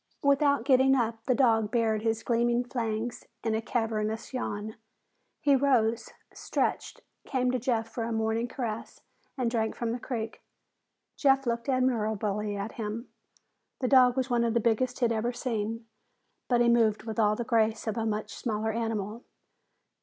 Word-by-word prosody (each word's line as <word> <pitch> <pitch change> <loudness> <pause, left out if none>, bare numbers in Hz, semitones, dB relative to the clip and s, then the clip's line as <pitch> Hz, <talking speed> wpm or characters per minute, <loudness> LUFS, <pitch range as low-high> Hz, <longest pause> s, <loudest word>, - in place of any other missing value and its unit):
Without 280 -2 +3
getting 265 0 +5
up, 225 -3 -1
the 255 - +3
dog 225 -5 +3
bared 220 -2 +1
his 225 0 -1
gleaming 240 0 +2
fangs 235 -2 -3 0.2
in 225 - 0
a 220 - 0
cavernous 220 0 -2
yawn. 215 -4 -4 0.7
He 285 -2 +4
rose, 240 -4 +2 0.2
stretched, - - -2 0.2
came 255 -2 0
to 255 - 0
Jeff 230 -2 0
for 225 0 -4
a 230 - -3
morning 225 +1 0
caress, 230 -4 -5 0.4
and 245 -3 0
drank 220 -2 0
from 235 -1 -2
the 240 - -3
creek. 230 -3 -5 0.8
Jeff 270 -1 +3
looked 235 +1 -2
admiringly 215 -5 0
at 200 +3 -4
him. 220 +3 -4 0.7
The 255 - 0
dog 255 -1 +5
was 260 -1 +1
one 240 -2 +1
of 230 -1 0
the - - +4
biggest 245 +3 0
he'd 235 -1 +3
ever 230 +2 0
seen, 230 -2 -3 0.6
but 240 -2 +3
he 240 - +4
moved 225 -3 +3
with 220 0 -4
all 210 -1 +4
the 235 - -3
grace 220 -2 +1
of 220 -2 -2
a 225 - -1
much 215 -1 -2
smaller 220 -2 -2
animal. 225 0 -3
230 Hz, 165 wpm, -28 LUFS, 220-250 Hz, 0.8 s, getting